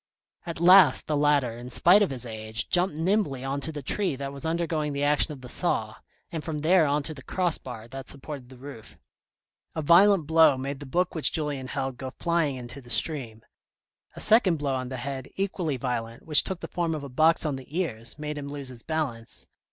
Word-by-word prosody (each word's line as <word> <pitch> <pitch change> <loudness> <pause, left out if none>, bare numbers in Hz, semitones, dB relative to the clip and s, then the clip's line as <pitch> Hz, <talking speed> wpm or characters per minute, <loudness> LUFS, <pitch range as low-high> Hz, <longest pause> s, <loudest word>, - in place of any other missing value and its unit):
At 170 - -4
last 175 -4 +6
the 150 - -1
latter, 145 -5 +2
in 120 +1 -9
spite 180 - +5
of 205 - +2
his 130 -2 -5
age, 110 0 -4
jumped 175 -3 +2
nimbly 165 -6 0
on 135 +1 -3
to 160 - -2
the 145 -2 -7
tree 190 +2 -1
that 140 +1 -6
was 140 +3 -5
undergoing 160 -3 -1
the 140 0 -2
action 150 +2 +2
of 140 -3 -9
the 125 - -9
saw, - - 0 0.4
and 160 -2 -4
from 160 -2 -4
there 160 +2 +3
on 145 +1 0
to 155 - -3
the 140 - -11
cross 175 +3 0
bar 115 -3 -9
that 135 +1 -8
supported 140 -2 -7
the 130 - -13
roof. 125 -5 -11 0.8
A 160 - -2
violent 180 +2 +5
blow 160 -3 +5
made 135 +1 -4
the 145 - -9
book 180 +7 0
which 160 - +1
Julien 145 -4 -3
held, 135 -1 -3
go 130 +1 -5
flying 165 0 -1
into 125 +2 -8
the 120 - -16
stream; 120 -5 -1 0.7
a - - -8
second 210 -6 +4
blow 145 -2 -2
on 130 -1 -3
the 130 - -5
head, 135 +1 -5
equally 180 -7 -2
violent, 115 -2 -4
which 150 -2 +6
took 185 -2 -5
the - - -5
form 170 -2 -2
of 150 - -6
a - - -6
box 160 +6 +3
on 150 -3 -1
the 135 +6 -6
ears, 115 -9 -2
made 150 0 -5
him 140 - -6
lose 140 -2 -5
his 125 -2 -9
balance. 135 -8 -4
145 Hz, 220 wpm, -26 LUFS, 130-165 Hz, 0.8 s, last